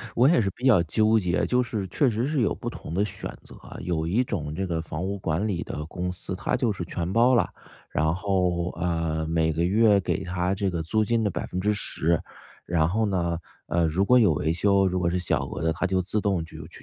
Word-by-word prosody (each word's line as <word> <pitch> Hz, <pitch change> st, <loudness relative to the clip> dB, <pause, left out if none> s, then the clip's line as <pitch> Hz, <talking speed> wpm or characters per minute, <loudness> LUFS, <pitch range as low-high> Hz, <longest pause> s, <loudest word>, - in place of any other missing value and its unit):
我 125 Hz, +3 st, +5 dB
也 165 Hz, -, +4 dB
是 100 Hz, -, 0 dB
比 125 Hz, -, -7 dB
较 115 Hz, -10 st, +6 dB
纠 110 Hz, +7 st, +3 dB
结， 90 Hz, -3 st, 0 dB
就 125 Hz, 0 st, +2 dB
是 110 Hz, -5 st, -3 dB
确 130 Hz, +9 st, +2 dB
实 115 Hz, +2 st, -1 dB
是 145 Hz, -1 st, 0 dB
有 110 Hz, -, +1 dB
不 -, -, -5 dB
同 -, -, -8 dB
的 95 Hz, +4 st, +2 dB
选 105 Hz, -, -6 dB
择。 -, -, -14 dB, 0.3 s
有 80 Hz, -3 st, -1 dB
一 110 Hz, +9 st, +2 dB
种 75 Hz, -11 st, -4 dB
这 95 Hz, +3 st, -2 dB
个 85 Hz, -3 st, -2 dB
房 80 Hz, +1 st, -5 dB
屋 100 Hz, +2 st, -2 dB
管 85 Hz, +2 st, -1 dB
理 90 Hz, -4 st, -2 dB
的 75 Hz, -, -5 dB
公 90 Hz, +3 st, -4 dB
司， 90 Hz, +1 st, -4 dB
它 -, -, -1 dB
就 120 Hz, -4 st, +1 dB
是 95 Hz, -3 st, -4 dB
全 85 Hz, +1 st, -3 dB
包 120 Hz, +4 st, +4 dB
了。 120 Hz, -, +2 dB, 0.4 s
然 80 Hz, +1 st, +1 dB
后， 90 Hz, -3 st, 0 dB
呃， 80 Hz, -2 st, -1 dB
每 80 Hz, 0 st, +1 dB
个 80 Hz, +2 st, 0 dB
月 105 Hz, +2 st, +4 dB
给 95 Hz, 0 st, -2 dB
它 90 Hz, +1 st, -1 dB
这 100 Hz, 0 st, 0 dB
个 85 Hz, -2 st, -2 dB
租 110 Hz, +7 st, +1 dB
金 115 Hz, +1 st, +1 dB
的 105 Hz, -, +1 dB
10%， 90 Hz, -3 st, -1 dB, 0.4 s
然 80 Hz, -2 st, +2 dB
后 110 Hz, +5 st, +1 dB
呢， 85 Hz, -4 st, 0 dB, 0.3 s
呃， 85 Hz, +2 st, +2 dB
如 85 Hz, +5 st, +1 dB
果 125 Hz, +4 st, +5 dB
有 105 Hz, -8 st, +5 dB
维 75 Hz, +2 st, 0 dB
修， 100 Hz, +2 st, +3 dB
如 90 Hz, -, -1 dB
果 90 Hz, -1 st, +1 dB
是 90 Hz, +1 st, 0 dB
小 90 Hz, -, 0 dB
额 -, -, -5 dB
的， 80 Hz, 0 st, +1 dB
它 85 Hz, -, -2 dB
就 95 Hz, 0 st, +1 dB
自 95 Hz, +4 st, -1 dB
动 95 Hz, -5 st, 0 dB
就 85 Hz, -, -11 dB
就 -, -, -8 dB
就 -, -, -18 dB
90 Hz, 255 characters per minute, -26 LUFS, 85-105 Hz, 0.4 s, 较